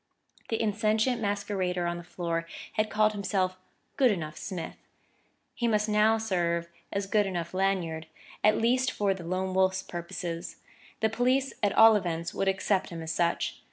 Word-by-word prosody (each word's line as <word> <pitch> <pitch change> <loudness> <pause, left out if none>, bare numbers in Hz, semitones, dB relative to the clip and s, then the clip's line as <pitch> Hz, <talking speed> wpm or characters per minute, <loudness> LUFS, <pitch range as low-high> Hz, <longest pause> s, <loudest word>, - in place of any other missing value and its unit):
The 225 - 0
insentient 220 +2 +1
masquerader 200 -4 -1
on 175 0 -1
the 175 - -8
floor 170 -1 -3 0.3
had 215 0 0
called 215 0 +3
himself 195 -2 -1 0.4
"good 265 -3 +5
enough 165 -7 -2
Smith"; 185 -5 -6 0.8
he 240 - -1
must 210 -2 +2
serve 210 -6 +2
now - - -26 0.2
as 200 0 -1
good 205 0 +2
enough 175 -2 -3
Lanyard, 180 -4 0 0.4
at 215 0 +5
least 255 +3 +2
for 200 -2 +1
the 190 -2 -8
Lone 185 +2 -2
Wolf's 190 0 +2
purposes; 170 0 -5 0.5
the 220 - +3
police 255 +4 +1
at 205 -2 +2
all 225 0 +8
events 170 -4 -2
would 195 - -1
accept 190 0 +1
him 165 -1 -6
as 160 - -3
such. 170 +1 0
195 Hz, 160 wpm, -29 LUFS, 175-215 Hz, 0.8 s, all